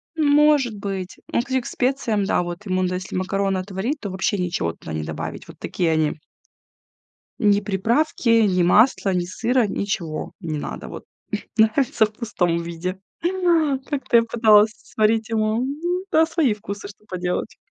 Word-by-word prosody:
Может 295 -5 +4
быть. 195 -2 -5
Ну - - +2
если 260 +2 0
к - - -16
специям, 245 -6 0
да, 180 - +1
вот, 175 +4 -7
ему, 185 -1 0
да, 180 - -2
если 185 +1 -5
макароны 195 +1 0
отварить, 195 +10 -3
то 205 - -5
вообще 190 +2 0
ничего 170 - -1
туда 80 - -9
не 80 0 -2
добавить. - - -6
Вот - - -13
такие 170 -3 -1
они. 155 -1 0 1.2
Ни 205 -2 +3
приправки, 230 +8 0 0.2
ни 180 -2 +2
масла, 205 +2 +4
ни 180 -1 0
сыра, 235 +6 +1
ничего 175 -6 -3
не 160 -5 -4
надо. - - -6
Вот - - -9 0.5
нравится 220 +1 +3
в 210 - -13
пустом 180 -7 -1
виде. 170 +2 -4 0.9
Как-то 280 -4 0
я 230 - +7
пыталась 220 -2 +5
сварить 220 -1 0
ему 215 -1 +1
М. 275 +3 -3 0.3
Да, 320 +1 +5
свои 320 -8 +1
вкусы, 200 -1 -7
что 205 +1 -15
поделать. 180 -1 -3
205 Hz, 160 wpm, -22 LUFS, 185-235 Hz, 1.2 s, я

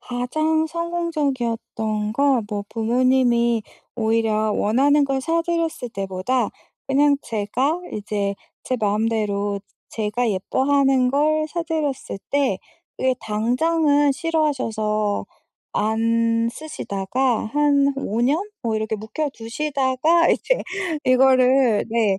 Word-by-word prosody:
가장 310 +6 0
성공적이었던 275 -11 -2
건 270 -2 +2
뭐 205 -1 -3
부모님이 240 0 +2 0.3
오히려 220 -1 +1
원하는 280 +9 +3
걸 270 -1 -1
사 330 +5 0
드렸을 330 -6 -2
때보다 195 +4 -1 0.4
그냥 285 +1 +3
제가 245 +10 -1
이제 205 -1 -2 0.3
제 255 - -2
마음대로 205 -1 0 0.3
제가 225 +2 -1
예뻐하는 265 +5 +2
걸 310 +3 +2
사 340 +2 -3
드렸을 305 - -3
때 280 -2 +1 0.4
그게 260 0 +1
당장은 285 +7 +2
싫어하셔서 225 -10 -1 0.5
안 230 +1 +1
쓰시다가 245 -4 -2
한 285 -1 +3
5 230 -4 -2
년? 275 +7 +2 0.2
뭐 225 -3 0
이렇게 220 0 -2
묵혀 220 +9 -3
두시다가 275 +6 +1
이제 - - +1 0.4
이거를 255 -2 +4
네 220 -4 +2
250 Hz, 225 characters per minute, -22 LUFS, 220-285 Hz, 0.5 s, 이거를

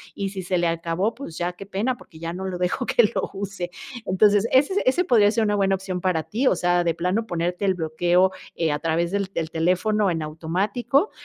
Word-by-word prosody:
y 200 -1 -2
si 190 -1 -6
se 180 0 -1
le 175 - +1
acabó, 165 +5 -1
pues, 230 -11 -9
ya 175 +1 -2
qué 195 +3 -10
pena, 220 +6 -1
porque 160 - -16
ya 165 +1 -4
no 190 +2 -5
lo 185 -1 -3
dejo 180 +8 -1
que 240 - +4
lo - - -1
use. 195 -2 -5 0.4
Entonces, 205 +3 +3
ese 295 +10 +3
ese 270 +8 +3
podría 220 - +4
ser 225 0 +1
una 210 -1 +1
buena 195 -1 +2
opción 185 -1 -4
para 175 -4 0
ti, 235 - -1
o - - +4
sea, 175 0 +2
de 170 -1 +1
plano 185 +7 -1
ponerte 175 +2 -2
el 190 -1 +2
bloqueo, 175 +3 +2 0.2
eh, 165 -2 0
a 145 - -1
través 165 +2 0
del 200 0 0
del 160 0 -2
teléfono 185 +5 +1
en 165 -3 -1
automático, 200 - 0
185 Hz, 225 wpm, -23 LUFS, 170-210 Hz, 0.4 s, que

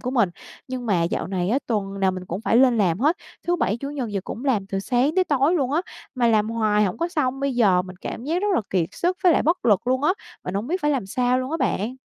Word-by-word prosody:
của 250 - -3
mình, 235 -8 +3 0.4
nhưng 255 -1 -5
mà 185 -6 +2
dạo 170 - -1
này 185 -1 -2
á, 260 - +3
tuần 200 -4 -2
nào 190 -1 +3
mình 185 0 -6
cũng 180 +4 -4
phải 225 - +2
lên 245 -2 +5
làm 180 -3 +2
hết, 305 +6 +3 0.3
thứ 350 - +2
Bảy, 215 - 0
Chủ 275 +3 -6
nhật 270 -6 -3
gì 205 - -2
cũng 245 - -6
làm 220 -8 +1
từ 195 0 -3
sáng 255 +7 +1
tới 375 -1 +3
tối 290 +1 +2
luôn 275 -6 0
á, 320 - +2 0.3
mà 245 -2 +2
làm 215 -1 +2
hoài 215 -2 +2
hổng 185 - -2
có 335 +1 0
xong. 270 -6 -1
Bây 275 -1 -1
giờ 195 -7 +4
mình 185 -1 -10
cảm 235 - -6
giác 340 +6 -1
rất 415 - +1
là - - +3
kiệt 175 -3 +1
sức 360 +2 -1
với 355 - +7
lại - - +2
bất 335 +4 0
lực 210 0 +3
luôn 260 +2 +1
á, 305 - +4 0.3
mình 180 - -4
hổng 205 +4 -2
biết 360 +6 -1
phải 295 - +2
làm 265 -9 -1
sao 250 +5 +1
luôn 255 +1 -3
á 325 - 0
bạn. 240 - -1
245 Hz, 290 wpm, -23 LUFS, 200-280 Hz, 0.4 s, với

